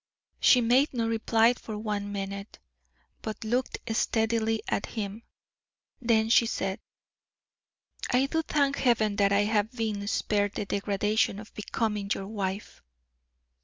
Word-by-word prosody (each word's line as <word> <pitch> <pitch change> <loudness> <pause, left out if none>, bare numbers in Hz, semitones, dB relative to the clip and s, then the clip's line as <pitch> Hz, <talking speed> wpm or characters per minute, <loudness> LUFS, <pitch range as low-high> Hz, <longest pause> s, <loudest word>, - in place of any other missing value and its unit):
She 250 - +6
made 255 +4 +3
no 230 -1 0
reply 225 +1 +3
for 220 -3 -7
one 210 -1 -3
minute, 200 0 -5 0.6
but 215 -1 -5
looked 245 +4 -1 0.2
steadily 225 0 +1
at - - -1
him: 210 -1 -5 0.8
then 225 -2 +3
she 235 -1 +5
said: 195 -1 -2 1.3
"I 255 +1 +3
do 320 +4 0
thank 280 -3 +1
Heaven 220 -5 +2
that 200 -1 +3
I 200 +1 +4
have 210 0 +1
been 215 -4 -2
spared 205 -1 0
the - - -2
degradation 200 +1 0
of 215 +1 -11
becoming 210 -1 -2
your 195 - -5
wife." 200 -1 -4
220 Hz, 130 wpm, -28 LUFS, 200-230 Hz, 1.3 s, She